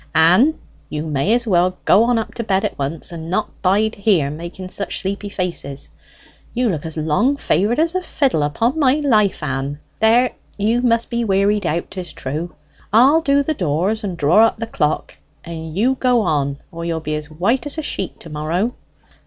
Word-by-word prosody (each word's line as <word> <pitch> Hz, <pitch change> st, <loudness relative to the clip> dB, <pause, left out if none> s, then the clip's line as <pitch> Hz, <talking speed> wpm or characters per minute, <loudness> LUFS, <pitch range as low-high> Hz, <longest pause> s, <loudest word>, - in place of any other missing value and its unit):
"Ann, 180 Hz, -, +5 dB, 0.3 s
you 150 Hz, 0 st, -3 dB
may 150 Hz, +5 st, 0 dB
as 240 Hz, 0 st, 0 dB
well 185 Hz, -3 st, +2 dB
go 220 Hz, -, +5 dB
on 245 Hz, 0 st, +2 dB, 0.2 s
to 235 Hz, -, -4 dB
bed 195 Hz, -3 st, +1 dB
at -, -, -4 dB
once, 145 Hz, +5 st, -3 dB
and 165 Hz, -1 st, -7 dB
not 190 Hz, +4 st, -2 dB
bide 205 Hz, +3 st, +1 dB
there 170 Hz, -10 st, +3 dB
making 170 Hz, +4 st, -7 dB
such 200 Hz, -, -3 dB
sleepy 200 Hz, +1 st, -4 dB
faces; 170 Hz, -8 st, -4 dB, 0.6 s
you 245 Hz, -1 st, +2 dB
look 160 Hz, -4 st, -3 dB
as 160 Hz, -, -8 dB
long 160 Hz, -, +1 dB
favoured 220 Hz, -2 st, +1 dB
as 325 Hz, +2 st, +2 dB
a 370 Hz, -, 0 dB
fiddle, 270 Hz, -, 0 dB
upon 225 Hz, -, 0 dB
my 265 Hz, -3 st, +4 dB
life, 220 Hz, -, +2 dB
Ann. 140 Hz, 0 st, -3 dB, 0.2 s
There, 235 Hz, +3 st, +4 dB, 0.3 s
you 220 Hz, +4 st, +1 dB
must 230 Hz, -1 st, +1 dB
be 235 Hz, 0 st, 0 dB
wearied 200 Hz, -1 st, +2 dB
out, 170 Hz, +2 st, -2 dB
'tis 185 Hz, -2 st, -6 dB
true. 155 Hz, +6 st, -5 dB, 0.4 s
I'll 265 Hz, +9 st, +6 dB
do 280 Hz, -2 st, +3 dB
the 315 Hz, -, -1 dB
doors 185 Hz, -, -1 dB
and 185 Hz, -4 st, -4 dB
draw 170 Hz, +9 st, +5 dB
up -, -, -4 dB
the 230 Hz, -, -3 dB
clock; 155 Hz, -8 st, -2 dB, 0.3 s
and 160 Hz, 0 st, -7 dB
you 245 Hz, +6 st, +3 dB
go 250 Hz, -2 st, +3 dB
on, 140 Hz, -7 st, 0 dB
or 170 Hz, 0 st, -7 dB
you'll 165 Hz, -1 st, -2 dB
be 155 Hz, -1 st, -4 dB
as 150 Hz, 0 st, -4 dB
white 200 Hz, -, 0 dB
as 290 Hz, -, -1 dB
a 315 Hz, -, -2 dB
sheet 190 Hz, -, -4 dB
to 165 Hz, -, -10 dB
morrow." 165 Hz, +10 st, -1 dB
195 Hz, 195 wpm, -19 LUFS, 160-235 Hz, 0.6 s, I'll